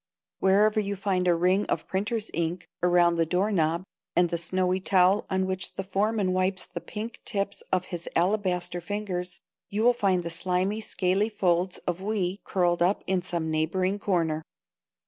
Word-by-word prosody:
Wherever 210 +3 +4
you 200 -1 -2
find 185 -2 0
a 175 - +5
ring 185 +4 +2
of - - -1
printer's 210 +3 -2
ink 170 +1 -2
around 175 -1 +4
the 165 - +3
door 185 +5 +1
knob, 165 -2 +1 0.3
and 175 -1 +3
the 170 - 0
snowy 185 +2 0
towel 190 +1 +3
on 190 0 +1
which 185 0 -3
the 195 - -3
foreman 200 0 0
wipes 185 0 0
the 175 -1 -7
pink 225 +2 -7
tips 200 0 -3
of 185 -1 +1
his 170 -1 -4
alabaster 180 -1 +1
fingers, 180 -2 -4 0.3
you 210 +2 -1
will 245 +1 +6
find 190 -6 +1
the 170 - -4
slimy, 185 +5 0
scaly 195 +1 0
folds 180 -3 +1
of 180 +1 -2
"we" 195 -2 -1
curled 175 -2 +1
up 185 +4 +2
in 190 -1 +1
some 170 -3 -3
neighboring 185 +5 0
corner. 165 -6 0
185 Hz, 170 wpm, -27 LUFS, 175-200 Hz, 0.3 s, will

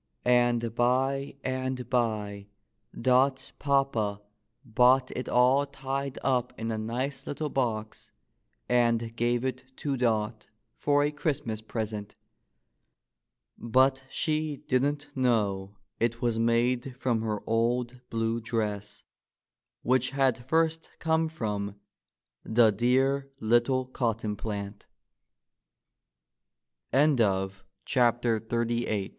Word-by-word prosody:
— - - -42
and 120 -2 +3
by 135 +4 +1
and 130 -1 -2
by 105 -5 -1 0.5
Dot's 130 +2 +2
papa 135 -8 +1 0.5
bought 125 +3 +4
it 125 - -4
all 130 +3 +4
tied 135 0 -4
up 125 -3 0
in 115 0 -2
a 110 - -2
nice 125 +5 -3
little 150 +1 -3
box, 110 -4 -2 0.6
and 115 -2 +2
gave 120 +1 0
it 130 0 -3
to 140 -2 -2
Dot 110 -3 0 0.3
for 145 0 +2
a 145 - +1
Christmas 140 -7 -2
present. 110 -2 -5 1.4
But 130 +3 +3
she 155 -1 -1
didn't 145 +3 +1
know 105 -6 0 0.2
it 115 0 0
was 120 -2 0
made 120 +2 +1
from 120 -3 0
her 110 -2 -2
old 120 +2 0
blue 115 0 -1
dress, 105 -3 -3 0.8
which 130 0 +2
had 130 -2 0
first 160 0 +1
come 160 0 +1
from 105 -9 -3 0.7
the 110 -1 +4
dear 135 +5 +1
little 120 +3 +2
cott 120 -3 -2
125 Hz, 95 wpm, -28 LUFS, 115-135 Hz, 1.4 s, bought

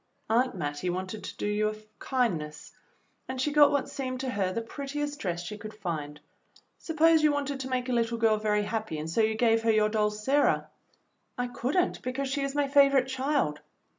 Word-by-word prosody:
Aunt 250 +1 +2
Mattie 145 0 -3
wanted 185 +4 -4
to - - -8
do - - -3
you 210 +1 +1
a 215 - -5 0.2
kindness, 165 - -2 0.6
and 260 0 -5
she 295 +3 +1
got 295 0 +7
what 285 -2 0
seemed 255 -2 -4
to 260 -1 -2
her 195 -5 0
the 230 +4 -3
prettiest 290 +4 -4
dress 175 -2 -3
she 210 +3 -7
could 215 +1 -8
find. 155 -7 -4 0.6
Suppose 325 0 +3
you 305 -1 +4
wanted 285 -1 -2
to 265 0 -5
make 255 -1 -1
a - - -2
little 235 0 +1
girl 225 -1 +3
very 210 -1 +1
happy 215 -6 -3
and 155 +1 -4
so 165 +8 +1
you 220 0 +2
gave 225 0 +3
her 225 - 0
your 215 -1 +3
doll, 210 -1 +2
Sarah." 265 +8 +1 0.7
"I 245 0 -2
could 250 +6 -2
n't, 360 - +1
because 265 +2 -3
she 280 +1 -1
is 275 0 -2
my 290 -1 +2
favorite 275 -2 +4
child." 265 - 0
235 Hz, 205 wpm, -28 LUFS, 210-275 Hz, 0.7 s, got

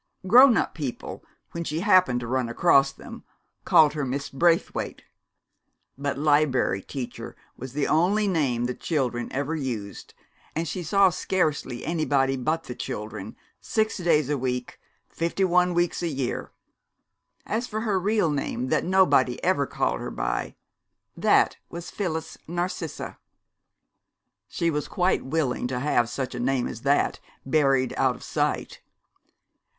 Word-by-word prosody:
Grown 245 +5 +7
up - - 0
people, 140 -7 -6 0.3
when 170 - -4
she 160 0 -3
happened 185 -11 +4
to 120 - -5
run 125 -1 -1
across 135 +1 +4
them, - - -11 0.4
called 150 -2 +6
her 150 -2 -2
Miss 135 +2 -3
Braithwaite. 165 +4 0 0.9
But 140 0 -3
"Liberry 145 -8 +2
Teacher" 130 +4 -7 0.2
was 130 0 -8
the 145 0 0
only 195 +7 +2
name 135 -10 +1
the 125 - -2
children 125 -6 -2
ever 145 +4 -2
used, 115 - -5 0.4
and 165 +2 -1
she 180 - -4
saw 195 +3 +4
scarcely 155 -9 -1
anybody 145 -5 +1
but 155 +6 -1
the 125 - -7
children, 105 -3 -6 0.2
six 220 0 -1
days 155 -5 +2
a 145 -1 -1
week, 125 -1 -3 0.3
fifty 170 +3 -2
one 180 -1 +3
weeks 175 0 +1
a 175 - -1
year. 135 -5 -3 0.9
As 235 +3 -2
for 215 0 -3
her 210 -4 +1
real 200 -3 +1
name, 135 -3 -2
that - - +1
nobody 180 -9 +3
ever 160 -7 +2
called - - -1
her - - -5
by, - - -3 0.6
that - - +3
was 170 0 -7
Phyllis 160 -5 -4
Narcissa. 175 -1 -4 1.3
She 170 0 -1
was 150 -1 -2
quite 180 -1 +1
willing 130 -4 -1
to 125 0 -3
have 120 -4 +1
such 130 +1 -4
a 125 - -5
name 125 0 0
as 115 - -7
that 140 +2 +1 0.3
buried 135 -3 +2
out 130 -2 +2
of - - -13
sight. - - -2
150 Hz, 145 wpm, -25 LUFS, 130-175 Hz, 1.3 s, Grown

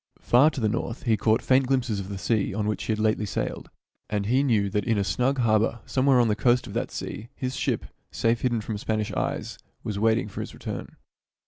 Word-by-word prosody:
Far 130 +6 +5
to 145 - -6
the 110 - +2
north 115 +2 -3
he 115 -3 +3
caught 110 +1 +2
faint 130 0 +3
glimpses 125 -6 0
of 95 0 -6
the 100 - -5
sea 100 0 0
on 105 -1 -1
which 105 0 -2
he - - -1
had 110 - 0
lately 110 -1 +1
sailed, - - -3 0.4
and 105 -1 -1
he 125 +6 +3
knew 110 -8 +2
that 105 0 0
in 115 0 +1
a 100 - +2
snug 125 +7 +1
harbor 115 -1 +2
somewhere 130 -1 +3
on 120 - +4
the 105 - +2
coast 120 +2 +2
of - - -9
that - - -2
sea 110 +3 -6
his 130 0 -3
ship, - - -1 0.2
safe 115 +9 0
hidden 120 -3 +1
from 105 0 -4
Spanish 110 0 -1
eyes, - - -3 0.2
was 105 -2 -3
wa, 115 +2 +4
iting 110 -1 +1
for - - -5
his - - -7
return. - - -6
110 Hz, 235 wpm, -26 LUFS, 105-125 Hz, 0.4 s, Far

